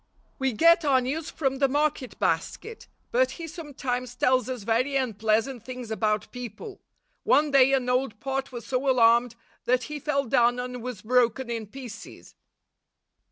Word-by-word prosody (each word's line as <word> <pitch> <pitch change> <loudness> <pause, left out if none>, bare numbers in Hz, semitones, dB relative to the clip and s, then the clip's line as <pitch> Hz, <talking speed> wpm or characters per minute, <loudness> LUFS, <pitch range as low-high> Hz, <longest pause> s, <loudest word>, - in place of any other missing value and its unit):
We 265 -2 0
get 335 +7 +5
our 275 -3 +4
news 285 +5 -3
from 270 -3 -2
the 275 - +4
market 290 -1 -1
basket, 450 0 -2 0.2
but - - +2
he 335 - -6
sometimes 265 -7 -5
tells 255 -1 +2
us 250 -5 -5
very 235 +6 0
unpleasant 225 0 0
things 250 -2 -7
about 215 -1 -1
people. 245 - -8 0.4
One 295 0 +3
day 270 -1 +6
an 260 -2 +1
old 250 -3 0
pot 270 +2 -3
was 240 -3 -7
so 270 +2 -1
alarmed, 235 -1 +4 0.3
that 250 0 +2
he 300 +4 -6
fell 280 -1 0
down 240 +1 +3
and 250 0 -5
was 250 -4 -6
broken 245 +1 +1
in 225 -2 -4
pieces. 240 -1 -11
255 Hz, 160 wpm, -26 LUFS, 235-275 Hz, 0.4 s, day